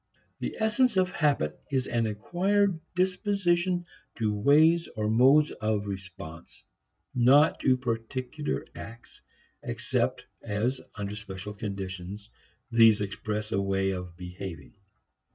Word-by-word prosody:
The - - -4
essence 220 +1 +2
of 185 -1 +3
habit 145 - +1
is 130 -2 +1
an 115 -3 0
acquired 180 - +1 0.2
predisposition 180 -1 +1 0.3
to 110 -2 0
ways 155 +10 +4
or 105 0 0
modes 135 +6 +5
of 110 -1 -1
response, 95 -4 -8 0.5
not 135 +6 +5
to 130 -1 +3
particular 125 +4 -3
acts 115 +1 -11 0.4
except - - -1 0.2
as, 115 +6 -1
under 105 0 -4
special 100 0 -7
conditions, 100 0 -6 0.4
these 115 -2 +6
express 105 +2 -3
a 100 - +1
way 95 0 +1
of 90 -2 -6
behaving. 90 -3 -8
115 Hz, 115 wpm, -28 LUFS, 100-155 Hz, 0.5 s, these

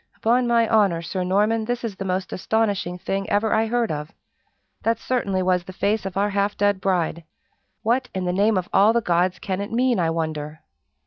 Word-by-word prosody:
"Upon 240 +2 +2
my 235 -1 +3
honor, 200 -7 +2
Sir 180 +3 -3
Norman, 210 +4 +1
this 245 +1 -3
is 220 -4 -4
the 195 - -6
most 185 0 -2
astonishing 200 -3 -1
thing 195 +2 -3
ever 210 +2 +1
I 220 +1 +2
heard 235 -2 0
of. 150 +1 -5 0.7
That 230 0 +1
certainly 200 -7 -1
was 180 -1 +1
the 185 - -9
face 205 -1 0
of 190 - -6
our 205 +1 +1
half 200 +1 0
dead 205 -1 +1
bride! 175 -3 0 0.6
What, 250 +3 +1
in 185 -1 -2
the 180 - 0
name 205 +2 +2
of 180 - -2
all 210 +3 +5
the 235 - +2
gods, 180 -1 +1
can 190 0 -3
it 205 - -5
mean, 245 -1 +2
I 165 -2 +1
wonder?" 155 -2 -3
200 Hz, 205 wpm, -23 LUFS, 180-225 Hz, 0.7 s, all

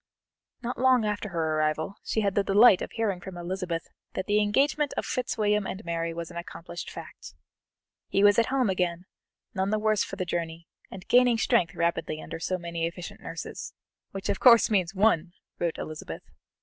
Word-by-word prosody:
Not 240 0 -4
long 255 -3 +4
after 210 0 -2
her 160 -3 -1
arrival 155 +5 -1
she 220 - 0
had 200 -2 +1
the 200 - +2
delight 200 0 +6
of - - -3
hearing 205 -6 -1
from 185 -1 -8
Elizabeth 175 -1 -3 0.3
that 190 - -2
the 210 0 +3
engagement 275 +7 +1
of - - -1
Fitzwilliam 210 -6 0
and 190 - -6
Mary 165 0 -2
was 170 0 -6
an - - -8
accomplished 170 0 -7
fact. - - -10 0.7
He 195 - +1
was 205 +1 +6
at 230 - +3
home 260 -3 +1
again, 180 -2 -1 0.5
none 190 0 0
the 215 - +1
worse 215 -1 +2
for - - -6
the 185 - -3
journey, 165 -1 -4 0.2
and 190 -1 -10
gaining 245 -1 +5
strength 180 -4 +2
rapidly 170 -2 -1
under 165 - -7
so 185 +3 -1
many 170 -1 -3
efficient 170 +1 -8
nurses, - - -7 0.3
"which 195 0 -6
of - - -1
course 235 -3 +7
means 190 -2 +1
one!" 185 -4 +2 0.3
wrote 170 -2 -1
Elizabeth. 155 0 -7
190 Hz, 185 wpm, -27 LUFS, 170-215 Hz, 0.7 s, course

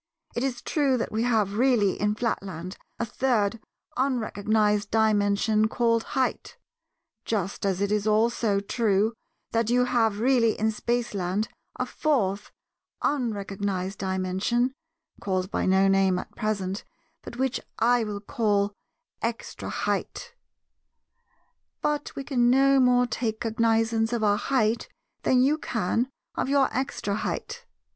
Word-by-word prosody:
It 235 - -1
is 250 -3 -2
true 280 -4 +1
that 230 - -3
we 220 - -1
have 220 -4 +1
really 240 -8 +3
in 210 0 +1
Flatland 190 -5 -3 0.2
a 235 - -1
Third 230 -3 0 0.4
unrecognized 215 -5 +1
Dimension 215 0 +2
called 230 0 +1 0.2
'height,' 260 -2 -1 0.7
just 200 -2 -2
as 190 0 -1
it 205 +1 0
also 215 -1 +2
is 200 - -2
true 220 -1 +2 0.4
that 230 -1 +1
you 250 +1 +3
have 225 -4 +1
really 235 -2 +3
in 220 +1 +2
Spaceland 215 -4 -1 0.3
a - - -2
Fourth 205 -10 0 0.5
unrecognized 200 -7 -2
Dimension, 190 +7 0 0.5
called 185 0 -2
by - - 0
no 190 +1 +4
name 195 -1 +3
at - - -7
present, 200 -3 -2 0.4
but - - -9
which 265 0 0 0.2
I 240 +1 +3
will 205 -2 -4
call 205 -2 0 0.5
'extra 230 0 -4
height.' - - -3 1.5
But 295 -1 -1
we 275 - -4
can 245 -3 +2
no 270 +2 +5
more 250 -1 +4
take 225 -2 -2
cognizance 225 0 +1
of 230 -2 -1
our 205 -1 +3
'height' 230 -3 0 0.3
than 255 -1 +3
you 295 +4 +2
can 230 0 -1 0.2
of - - -2
your 275 -1 +3
'extra 255 -6 -2
height. 480 - -4
220 Hz, 130 wpm, -26 LUFS, 200-245 Hz, 1.5 s, no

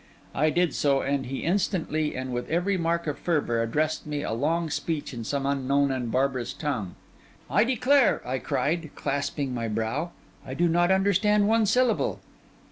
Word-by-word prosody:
I 155 +3 +2
did 175 +1 +1
so, 140 -2 +2
and 140 -2 -1
he 135 +1 -4
instantly, 165 -4 0
and 130 0 -4
with 120 0 -3
every 180 +4 +1
mark 170 -1 0
of 150 -2 -3
fervour, 145 -9 0
addressed 150 +7 -1
me 145 -1 -3
a - - -3
long 160 +6 0
speech 150 0 -3
in 115 -2 -5
some 140 +4 -2
unknown 140 0 +1
and 125 -3 -2
barbarous 130 -2 0
tongue. 125 - -3 0.6
'I - - +4
declare,' 260 +1 +3
I 130 +1 -1
cried, 155 +7 -1
clasping 140 -1 -2
my 115 -2 -2
brow, 115 +9 -2 0.3
'I 130 -1 -7
do 175 +4 +2
not 175 +1 +2
understand 200 +2 +3
one 220 0 +3
syllable. 245 +2 +2
150 Hz, 170 wpm, -26 LUFS, 130-175 Hz, 0.6 s, I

